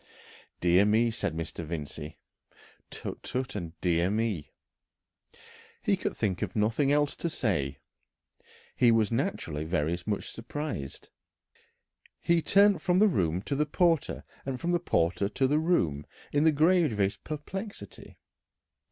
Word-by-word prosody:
'" - - -25
"Dear 90 +2 +5
me," 110 +3 +3
said 100 -7 -3
Mr. 80 +1 -5
Vincey. 75 -1 -6 0.7
"Tut, - - -6
tut," 130 0 -3
and 85 -4 -6
"Dear 85 0 +2
me!" 105 -7 -1 1.3
He - - +3
could - - -4
think 95 -4 -1
of - - -3
nothing 115 +7 +2
else 145 0 +2
to 170 - -2
say. 80 - -1 1.0
He 120 -2 +5
was 110 -1 +2
naturally 115 - -2
very 80 0 0
much 105 -2 -2
surprised. 115 - -6 1.1
He 170 0 +2
turned 200 -1 +4
from 180 +1 +2
the 215 +3 +6
room 90 - 0
to 140 - -2
the 150 +2 +1
porter 165 0 +1 0.2
and 130 -2 -4
from 170 - -1
the 175 - +2
porter 95 - +1
to 135 - 0
the 145 +3 +3
room 85 - +1 0.3
in 145 +2 +3
the 160 - +6
gravest 150 - +2
perplexity. 190 +8 -7
115 Hz, 140 wpm, -29 LUFS, -, 1.3 s, the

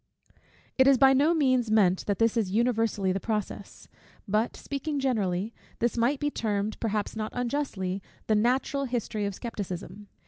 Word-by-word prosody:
It 260 - +6
is 275 -1 +6
by 270 +1 +6
no 285 +5 +4
means 255 -6 +2
meant 195 -4 +3
that 200 -2 0
this 230 0 +2
is 220 -5 +1
universally 225 -3 +1
the 190 - -1
process. 210 0 -4 0.4
But, 215 +4 0
speaking 285 +1 -3
generally, 215 -5 0 0.2
this 235 0 0
might 245 +4 +1
be 295 0 -1
termed, 210 -3 -2
perhaps 215 -2 -2
not 215 0 -3
unjustly, 235 -7 -2 0.2
the 220 - +1
natural 255 +5 +1
history 235 -4 -2
of 200 -1 -3
scepticism. 205 -2 -6
225 Hz, 160 wpm, -27 LUFS, 205-255 Hz, 0.4 s, It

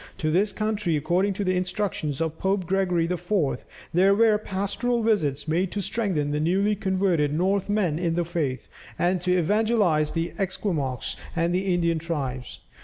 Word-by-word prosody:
To 155 -5 -1
this 200 +5 +2
country, 210 -6 -1
according 180 +6 +1
to 200 - -3
the 185 -1 +1
instructions 180 -5 -2
of 160 -1 -2
Pope 190 -1 0
Gregory 180 -2 +1
IV., 175 -2 -1 0.3
there 190 +3 +5
were 220 -1 +4
pastoral 210 +4 -1
visits 155 -11 +1
made 175 +4 0
to 205 - -2
strengthen 185 -8 -1
the 150 - 0
newly 195 +6 +2
converted 185 -7 +1
Northmen 190 0 +1
in 170 -2 0
the 175 0 0
faith, 155 -7 -2 0.3
and 180 0 +1
to 180 0 +2
evangelize 200 -4 +2
the 165 0 -2
Esquimaux 165 - -1 0.3
and 170 +1 +1
the 190 +1 0
Indian 170 -2 +1
tribes. 135 -7 -4
180 Hz, 160 wpm, -25 LUFS, 160-200 Hz, 0.3 s, there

